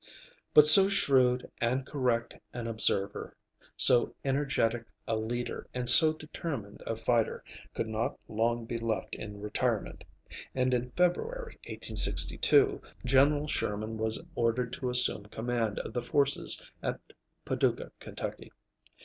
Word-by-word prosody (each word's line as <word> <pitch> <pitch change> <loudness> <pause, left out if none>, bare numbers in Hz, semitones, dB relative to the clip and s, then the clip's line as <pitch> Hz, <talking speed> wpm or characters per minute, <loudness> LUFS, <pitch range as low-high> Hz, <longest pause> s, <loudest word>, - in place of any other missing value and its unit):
But 150 - +7
so 190 +6 +11
shrewd 130 -9 +1
and 125 +3 -2
correct 125 -5 -3 0.2
an 120 -1 -7
observer, 100 -3 -1 0.4
so 120 -1 +5
energetic 135 -4 -2 0.2
a 115 - -2
leader, 120 +3 -6
and 125 -1 -5
so 155 +6 +11
determined 150 -8 -9
a 115 - -4
fighter, 115 0 -2 0.3
could - - -4
not 110 +1 -5
long 115 +2 -3
be 115 0 -6
left 110 -4 -5
in 105 -1 -9
retirement, 105 +1 -4 0.5
and 130 0 -1
in 125 0 -3
February, 470 - -3
1862, 410 -2 0 0.2
General 145 +3 +1
Sherman 110 -4 -4
was 110 0 0
ordered 120 -2 -3
to 130 - -5
assume 125 -4 +3
command 115 -1 -4
of - - -7
the 120 - -4
forces 140 +3 0 0.2
at - - -5 0.5
Paducah, - - -3
Ky. - - -9
120 Hz, 125 wpm, -27 LUFS, 115-140 Hz, 0.5 s, so